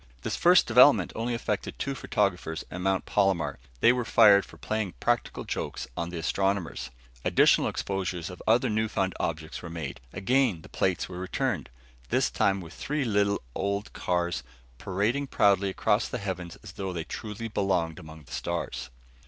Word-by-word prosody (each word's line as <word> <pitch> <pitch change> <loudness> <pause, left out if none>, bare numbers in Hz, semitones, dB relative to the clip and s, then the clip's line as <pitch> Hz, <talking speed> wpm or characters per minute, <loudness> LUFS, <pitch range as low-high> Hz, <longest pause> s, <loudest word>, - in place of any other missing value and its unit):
This - - -1
first 180 +1 +6
development 125 +5 +6
only 120 +2 -1
affected 115 - -3
two 140 - -2
photographers 100 -10 -1
at 90 - -5
Mount 95 0 +1
Palomar. 95 -5 +1 0.2
They 120 - +7
were 125 -1 -1
fired 105 -3 +6
for - - -14
playing 110 -4 -2
practical - - 0
jokes - - -4
on 85 0 -3
the 85 - -6
astronomers. 95 +1 -1 0.3
Additional - - +4
exposures 95 -2 -3
of 90 - -10
other 120 +4 +4
newfound 105 -4 0
objects 80 -1 -3
were 85 - -7
made. 80 -6 -5
Again 105 -3 +1
the - - -13
plates 95 -2 0
were 90 -1 -7
returned; 95 0 -2 0.4
this - - +2
time 100 -1 +1
with 85 -1 -10
three 145 -1 -2
little 100 - +1
old 100 - -2
cars 90 -1 -1 0.4
parading 105 +9 0
proudly 100 -4 +3
across 105 +3 +1
the - - -4
heavens 90 -5 -5
as - - -9
though 95 -2 -4
they 85 -2 -3
truly 110 +5 -6
belonged 95 -6 0
among 80 0 -11
the - - -18
stars. 85 -7 -3
95 Hz, 165 wpm, -28 LUFS, 90-110 Hz, 0.4 s, They